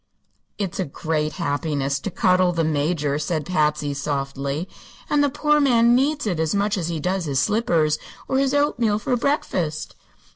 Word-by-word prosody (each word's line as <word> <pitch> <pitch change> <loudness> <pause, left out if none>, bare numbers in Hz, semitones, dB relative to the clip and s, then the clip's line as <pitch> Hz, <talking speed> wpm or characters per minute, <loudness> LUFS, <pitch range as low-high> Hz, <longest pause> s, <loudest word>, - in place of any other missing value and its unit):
"It's 195 -3 -3
a 190 - 0
great 155 +1 -2
happiness 145 -4 -1
to 200 - -4
cuddle 185 0 +3
the 165 -1 0
Major," 150 -1 0
said 155 0 -2
Patsy, 150 -4 0
softly; 140 +2 -3 0.4
"and 290 -1 +4
the 285 - +3
poor 300 +2 +2
man 240 -4 +4
needs 285 +3 +1
it 180 -6 -1
as 160 +3 0
much 205 +1 +1
as 175 -5 -2
he 165 -2 -3
does 180 +3 -1
his 140 -3 0
slippers 165 -8 +1 0.3
or 265 - +1
his 275 0 +1
oatmeal 240 -7 +2
for 245 +4 -1
breakfast." 185 - -1
170 Hz, 170 wpm, -22 LUFS, 150-230 Hz, 0.4 s, and